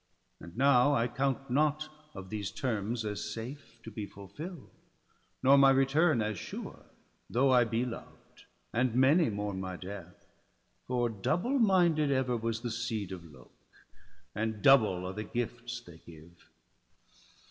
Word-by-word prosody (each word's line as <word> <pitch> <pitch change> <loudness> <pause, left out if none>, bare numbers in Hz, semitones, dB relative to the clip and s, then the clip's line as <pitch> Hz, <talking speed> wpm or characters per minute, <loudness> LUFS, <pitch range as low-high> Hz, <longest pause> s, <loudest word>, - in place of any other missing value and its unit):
And 85 +5 -12
now 140 +1 +5
I 115 -2 +2
count 135 0 -2
not 150 +2 +1 0.3
of 95 -1 -9
these 105 -3 -3
terms 115 -1 -2
as 105 -1 -3
safe 120 +2 -8
To 115 - -9
be 105 -1 -5
fulfill'd, 135 - -10 0.7
nor 135 +2 +7
my 135 0 +7
return 135 0 +3
as 105 -3 -3
sure, - - -8 0.4
Though 130 +3 +3
I 125 -2 +5
be 115 +2 -1
loved, 120 -2 -10 0.3
and 125 -1 +1
many 140 +5 +5
mourn 100 -2 -3
my 95 -1 -5
death; 90 -2 -9 0.6
For 125 -1 +1
double 175 - 0
minded 175 -8 +4
ever 130 -2 +1
was 115 -1 -2
the 120 -1 -3
seed 110 -4 -3
Of 90 -2 -7
Lok, 65 -3 -17 0.8
and 110 -1 -3
double 110 -10 +5
are 95 - -4
the 105 - -4
gifts 120 +1 -4
they 85 -7 -14
give. 85 +1 -16
120 Hz, 145 wpm, -31 LUFS, 105-135 Hz, 0.8 s, nor